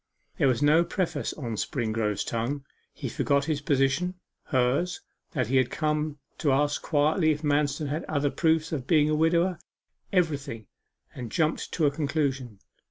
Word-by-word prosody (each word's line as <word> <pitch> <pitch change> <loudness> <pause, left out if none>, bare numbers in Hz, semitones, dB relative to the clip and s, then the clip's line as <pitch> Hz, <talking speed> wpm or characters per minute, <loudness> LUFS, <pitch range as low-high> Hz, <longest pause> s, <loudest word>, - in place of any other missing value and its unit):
There - - +4
was 130 +2 +2
no 155 +3 +5
preface 175 +1 -2
on 120 -7 -5
Springrove's 110 -5 -1
tongue; 130 +5 -3 0.3
he - - -6
forgot 140 0 +1
his 150 -2 -1
position 140 +6 +1 0.3
hers 130 +6 +1 0.3
that 130 -5 +1
he 130 +5 +1
had 130 -2 +3
come 150 -1 -1 0.2
to 145 - +2
ask 145 +2 +1
quietly 155 +2 +2
if 150 0 0
Manston 145 0 +1
had 150 +4 -2
other 145 -2 0
proofs 160 -1 +1
of 135 -5 -3
being 155 -2 +4
a - - +2
widower 170 +3 +2 0.5
everything 145 - 0 0.5
and 120 -4 -7
jumped 160 0 0
to 160 - +2
a 145 - +4
conclusion. 140 -6 -2
145 Hz, 160 wpm, -27 LUFS, 135-160 Hz, 0.5 s, no